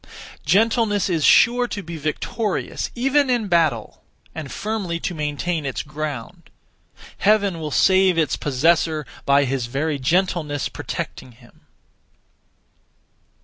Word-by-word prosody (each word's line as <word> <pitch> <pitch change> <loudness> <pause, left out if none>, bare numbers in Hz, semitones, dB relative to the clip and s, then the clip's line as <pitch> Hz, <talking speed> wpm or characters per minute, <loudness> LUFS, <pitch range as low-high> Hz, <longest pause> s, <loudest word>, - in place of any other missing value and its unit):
Gentleness 210 - +2
is 165 -4 0
sure 245 +8 +5
to 205 -4 -5
be 165 +1 -7
victorious 185 +8 -3
even 270 +3 +2
in 240 -4 +1
battle, 160 - 0 0.3
and 155 -4 -7
firmly 200 -6 -3
to 175 - -3
maintain 155 +2 -2
its 135 -2 -3
ground. 150 +2 -6 0.7
Heaven 200 -4 +2
will 155 -1 -4
save 185 +5 +4
its 160 -2 +1
possessor, 155 +2 +1 0.2
by 140 0 +4
his 130 -2 -2
(very) 140 +4 -2
gentleness 160 -1 0
protecting 125 - -6
him. 120 +1 -22
165 Hz, 115 wpm, -22 LUFS, 145-200 Hz, 0.7 s, sure